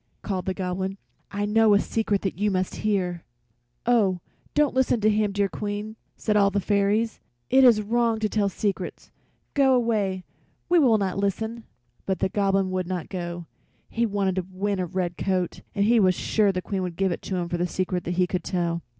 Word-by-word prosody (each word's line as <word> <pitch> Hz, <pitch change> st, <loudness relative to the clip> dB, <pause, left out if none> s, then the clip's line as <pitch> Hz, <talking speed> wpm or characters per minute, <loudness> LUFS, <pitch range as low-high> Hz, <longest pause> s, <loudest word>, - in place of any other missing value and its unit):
called 185 Hz, -3 st, -3 dB
the 190 Hz, -, +1 dB
Goblin. 190 Hz, +1 st, -3 dB, 0.3 s
"I 205 Hz, 0 st, -2 dB
know 215 Hz, 0 st, +4 dB
a -, -, +5 dB
secret 205 Hz, -2 st, -1 dB
you 210 Hz, +3 st, +1 dB
must 185 Hz, -1 st, -1 dB
hear." 185 Hz, -5 st, -1 dB, 0.6 s
"Oh, 210 Hz, -7 st, +3 dB, 0.4 s
don't 295 Hz, -2 st, +3 dB
listen 260 Hz, -2 st, +2 dB
to 215 Hz, +1 st, +4 dB
him, 210 Hz, -1 st, +1 dB
dear 200 Hz, 0 st, +1 dB
Queen!" 205 Hz, +2 st, -5 dB, 0.2 s
said 210 Hz, -, 0 dB
all 200 Hz, -1 st, +5 dB
the 200 Hz, -, -2 dB
little 200 Hz, -, -1 dB
fairies. 205 Hz, +2 st, +2 dB, 0.3 s
"It 265 Hz, +1 st, +6 dB
is 230 Hz, -4 st, +6 dB
wrong 230 Hz, +1 st, +1 dB
to 215 Hz, -, +2 dB
tell 205 Hz, -1 st, +1 dB
secrets. 195 Hz, -2 st, -4 dB, 0.4 s
Go 270 Hz, -2 st, +4 dB
away, 210 Hz, -6 st, 0 dB, 0.4 s
we 350 Hz, 0 st, +4 dB
will 245 Hz, -7 st, +5 dB
not 195 Hz, -2 st, -1 dB
listen." 220 Hz, +3 st, -2 dB, 0.4 s
But 190 Hz, -1 st, 0 dB
the -, -, 0 dB
Goblin 195 Hz, -1 st, +1 dB
would 185 Hz, -1 st, -2 dB
not 180 Hz, -3 st, -4 dB
go; 175 Hz, -2 st, -5 dB, 0.4 s
he 235 Hz, 0 st, 0 dB
wanted 195 Hz, -2 st, -1 dB
to 185 Hz, -1 st, -2 dB
win 200 Hz, +1 st, -1 dB
a 180 Hz, -, -1 dB
red 175 Hz, -1 st, -3 dB
coat, 185 Hz, -2 st, -1 dB
and 200 Hz, -1 st, +2 dB
he 230 Hz, +2 st, +4 dB
was 185 Hz, -3 st, +4 dB
sure 210 Hz, +1 st, +2 dB
the 185 Hz, -1 st, -3 dB
Queen 195 Hz, -2 st, -2 dB
would 180 Hz, -2 st, -4 dB
give 190 Hz, +1 st, +1 dB
it -, -, -4 dB
to 190 Hz, -, -4 dB
him 175 Hz, -1 st, -1 dB
for 175 Hz, -, -2 dB
the 175 Hz, -, +1 dB
secret 180 Hz, 0 st, -2 dB
he 180 Hz, +1 st, +2 dB
could 180 Hz, -1 st, -3 dB
tell. 170 Hz, -2 st, -1 dB
200 Hz, 200 wpm, -25 LUFS, 185-215 Hz, 0.6 s, It